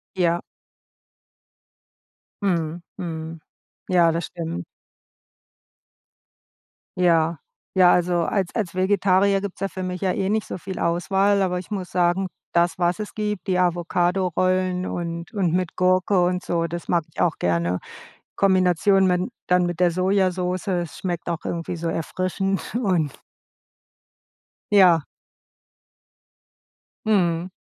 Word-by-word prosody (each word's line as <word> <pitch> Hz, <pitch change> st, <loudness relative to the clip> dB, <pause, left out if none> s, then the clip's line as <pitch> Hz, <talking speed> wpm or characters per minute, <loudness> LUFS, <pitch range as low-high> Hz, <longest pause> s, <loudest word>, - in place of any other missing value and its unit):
Ja. 175 Hz, -2 st, +2 dB, 2.0 s
Mhm, 170 Hz, -3 st, -1 dB, 0.2 s
mhm. 160 Hz, -2 st, -5 dB, 0.5 s
Ja, 170 Hz, -3 st, +4 dB
das 170 Hz, +1 st, -2 dB
stimmt. 165 Hz, -, -5 dB, 2.3 s
Ja. 165 Hz, -2 st, +3 dB, 0.4 s
Ja, 180 Hz, -1 st, +7 dB
also 175 Hz, -1 st, +2 dB
als 190 Hz, +1 st, 0 dB
als 210 Hz, -7 st, -2 dB
Vegetarier 195 Hz, +1 st, +3 dB
gibt's 200 Hz, -1 st, -6 dB
ja 195 Hz, -, 0 dB
für 185 Hz, -, -6 dB
mich 180 Hz, -1 st, -4 dB
ja 190 Hz, -2 st, +1 dB
eh 190 Hz, +1 st, -1 dB
nicht 215 Hz, 0 st, 0 dB
so -, -, -5 dB
viel 190 Hz, +1 st, -6 dB
Auswahl, 195 Hz, +4 st, +2 dB
aber 180 Hz, -1 st, 0 dB
ich 185 Hz, +4 st, -9 dB
muss 190 Hz, -3 st, -4 dB
sagen, 180 Hz, +2 st, +1 dB, 0.2 s
das, 170 Hz, 0 st, +2 dB
was 175 Hz, +2 st, +1 dB
es 210 Hz, -, -6 dB
gibt, 210 Hz, -2 st, -3 dB
die 185 Hz, -1 st, +2 dB
Avocadorollen 180 Hz, +1 st, +1 dB
und 170 Hz, 0 st, -5 dB
und 185 Hz, -5 st, +1 dB
mit 180 Hz, -1 st, -1 dB
Gurke 185 Hz, +1 st, +3 dB
und 180 Hz, +1 st, -1 dB
so, 170 Hz, -1 st, 0 dB
das 170 Hz, +1 st, -6 dB
mag 170 Hz, -2 st, +2 dB
ich -, -, -6 dB
auch 170 Hz, -, +2 dB
gerne. 85 Hz, +1 st, 0 dB, 0.6 s
Kombination 190 Hz, 0 st, +3 dB
mit 180 Hz, 0 st, +2 dB, 0.2 s
dann 180 Hz, 0 st, +3 dB
mit 175 Hz, -1 st, -3 dB
der 180 Hz, -1 st, +4 dB
Sojasoße. 185 Hz, 0 st, 0 dB
Es 170 Hz, -, -7 dB
schmeckt 175 Hz, -2 st, -3 dB
auch 170 Hz, -1 st, -2 dB
irgendwie 170 Hz, 0 st, -3 dB
so 170 Hz, -, -3 dB
erfrischend 185 Hz, +4 st, -2 dB
und 180 Hz, -, 0 dB, 1.5 s
Ja. 180 Hz, -6 st, +6 dB, 2.0 s
Mhm. 180 Hz, -4 st, +1 dB
180 Hz, 125 wpm, -23 LUFS, 170-190 Hz, 2.3 s, Ja